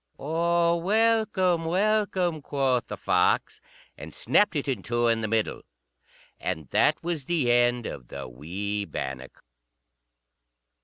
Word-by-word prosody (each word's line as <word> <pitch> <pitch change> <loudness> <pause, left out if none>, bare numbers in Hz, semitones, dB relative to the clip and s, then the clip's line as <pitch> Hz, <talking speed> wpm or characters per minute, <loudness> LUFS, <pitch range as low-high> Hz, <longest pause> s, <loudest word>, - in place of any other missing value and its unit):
"O 170 +3 +1
welcome, 195 -3 +2
welcome," 185 -2 0
quoth 135 -3 0
the - - -6
fox, - - +1 0.4
and - - -8
snapped 205 -5 +2
it 145 -1 -2
in 130 -7 -1
two 120 +3 -1
in 115 -1 +2
the 110 - -1
middle. 110 0 -1 0.8
And 80 -3 -4
that - - +2
was 165 -5 -3
the 150 -8 +1
end 120 -1 +2
of 60 -3 -7
the - - -7
wee 95 +11 -4
bannock. 65 -6 -7
140 Hz, 125 wpm, -26 LUFS, 110-175 Hz, 0.8 s, welcome